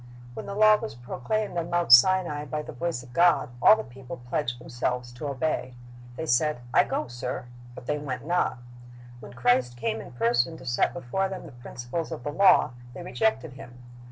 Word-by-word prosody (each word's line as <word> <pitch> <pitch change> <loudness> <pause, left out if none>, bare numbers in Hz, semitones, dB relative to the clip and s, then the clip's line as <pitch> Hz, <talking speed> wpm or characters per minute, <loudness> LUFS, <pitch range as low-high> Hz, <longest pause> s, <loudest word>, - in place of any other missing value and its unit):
Wh^n - - -7
the 200 - -5
law 215 0 +6
was 110 - -7
proclaimed 170 - -3
on 170 0 -4
Mount 175 -8 +4
Sinai 150 +2 +5
by 150 +2 -4
the - - -8
voice 145 -1 -3
of 125 -1 -15
God, 175 0 +4
all - - +8
the 220 - -5
people 130 +1 -10
pledged 120 +1 -3
themselves 125 0 -3
to 120 +4 -6
obey. 135 -2 -2 0.4
They 160 - -4
said, 150 +1 +1
"I - - +5
go, - - -2
sir," 120 +1 -5 0.3
but - - -10
they 150 +2 -1
went 140 -2 -5
not. 175 -4 0 0.6
When - - -11
Christ 125 0 +1
came 115 -2 -2
in - - -12
person 120 +6 +1
to 130 - -13
set 120 +6 +1
before 180 +5 -2
them 190 -2 -7
the 160 - -11
principles 120 +6 -6
of 160 - -6
the 145 - -3
law, 190 -3 +5 0.2
they 175 - -7
rejected 180 - -1
Him. 125 -2 -12
130 Hz, 195 wpm, -26 LUFS, 120-170 Hz, 0.6 s, all